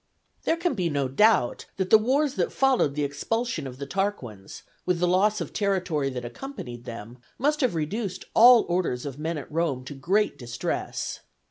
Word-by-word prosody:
There 330 - +2
can 340 -1 0
be 180 -7 -1
no 140 -3 0
doubt 135 - +3
that 190 -1 -2
the 220 - +9
wars 270 +5 +1
that - - -1
followed 260 - +2
the 150 - 0
expulsion 155 - -2
of 125 -1 -9
the 140 - -5
Tarquins, 140 - -4 0.2
with 180 -1 +1
the 180 - +2
loss 200 +4 +3
of - - -5
territory 180 -8 0
that 125 -2 -5
accompanied 120 - -8
them, 115 +1 -8 0.2
must 295 +3 +1
have 250 -9 +1
reduced 185 +4 -3
all 240 +1 +8
orders 175 -8 -1
of 140 0 -6
men 160 +1 -2
at 145 - -8
Rome 150 -5 -1
to 145 - -7
great 190 +10 0
distress. 120 -2 -3
175 Hz, 185 wpm, -26 LUFS, 135-215 Hz, 0.2 s, the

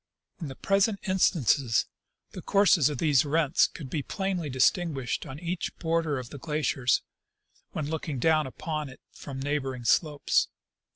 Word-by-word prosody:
In 165 - -5
the 135 - -7
present 200 +2 +2
instance 140 - +2 0.5
the - - -8
courses 195 -7 +4
of 145 - -4
these 145 -2 +3
rents 150 0 +3
could 150 - -9
be 145 +3 -2
plainly 190 -1 -3
distinguished 135 0 0
on 135 -1 -7
each 175 +2 -4
border 165 -3 0
of 125 -2 -7
the 145 - -8
glacier, 150 -4 -2 0.9
when 155 -2 -3
looking 155 -2 -3
down 155 +2 +2
upon 155 +2 -4
it 125 - -13
from 135 -2 -8
neighboring 135 -3 -2
slopes. 150 +4 +2
150 Hz, 150 wpm, -28 LUFS, 135-165 Hz, 0.9 s, courses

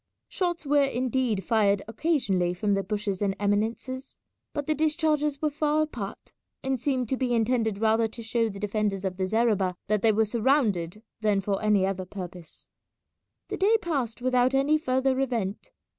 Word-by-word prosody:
Shots 345 -3 -2
were 290 0 +4
indeed 255 -5 0
fired 205 -2 +2
occasionally 215 - 0
from 205 +3 0
the 195 - +1
bushes 205 -1 -3
and 195 -1 +1
eminences, 225 +6 -2 0.3
but 290 -1 -3
the 310 - +1
discharges 305 -2 +1
were 305 - +2
far 300 +1 +1
apart, 235 -10 -7 0.3
and 265 -1 -1
seemed 255 -1 0
to 265 - 0
be 245 -2 0
intended 225 -2 +1
rather 225 +1 +2
to 230 +1 -9
show 225 0 +1
the 195 -1 -8
defenders 205 -1 -1
of 185 -1 -3
the 190 -1 -1
zareba 205 -4 +1
that 210 -1 +1
they 225 - +5
were 220 +1 +2
surrounded 215 - +1 0.2
than 210 -2 +2
for 195 0 -2
any 210 -3 +3
other 190 -1 -2
purpose. 180 -3 -9 0.8
The - - -3
day 430 +4 +4
passed 265 - -3
without 255 +1 +3
any 290 +3 +3
further 260 -1 +1
event. 225 -7 -2
225 Hz, 170 wpm, -27 LUFS, 200-270 Hz, 0.8 s, they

